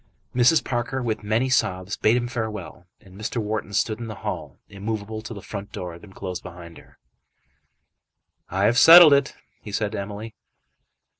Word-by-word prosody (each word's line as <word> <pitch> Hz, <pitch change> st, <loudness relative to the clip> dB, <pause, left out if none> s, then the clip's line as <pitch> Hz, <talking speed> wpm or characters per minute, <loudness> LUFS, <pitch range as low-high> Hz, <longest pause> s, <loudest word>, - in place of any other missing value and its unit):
Mrs. 125 Hz, +6 st, +4 dB
Parker, 125 Hz, +1 st, -2 dB
with 110 Hz, -2 st, -2 dB
many 110 Hz, +5 st, 0 dB
sobs, 95 Hz, -7 st, 0 dB
bade 110 Hz, +3 st, +2 dB
him 120 Hz, -1 st, -2 dB
farewell, 105 Hz, -, -6 dB
and 95 Hz, -1 st, -17 dB
Mr. 110 Hz, +4 st, -5 dB
Wharton 105 Hz, -2 st, -3 dB
stood 110 Hz, +2 st, 0 dB
in 115 Hz, -, -6 dB
the 110 Hz, -, -6 dB
hall -, -, -5 dB
immovable 110 Hz, +1 st, -5 dB
till 115 Hz, 0 st, -8 dB
the 100 Hz, -, -10 dB
front 100 Hz, 0 st, -7 dB
door 90 Hz, -1 st, -6 dB
had 85 Hz, -, -12 dB
been 105 Hz, -, -14 dB
closed 90 Hz, -2 st, -6 dB
behind 85 Hz, -1 st, -11 dB
her. -, -, -21 dB, 1.5 s
"I 95 Hz, +2 st, -1 dB
have 120 Hz, +4 st, +4 dB
settled 165 Hz, +1 st, +10 dB
it," 140 Hz, -1 st, +1 dB, 0.3 s
he 105 Hz, -, -9 dB
said 105 Hz, +1 st, -1 dB
to 110 Hz, -, -4 dB
Emily. 105 Hz, +3 st, -7 dB
110 Hz, 175 wpm, -23 LUFS, 100-120 Hz, 1.5 s, settled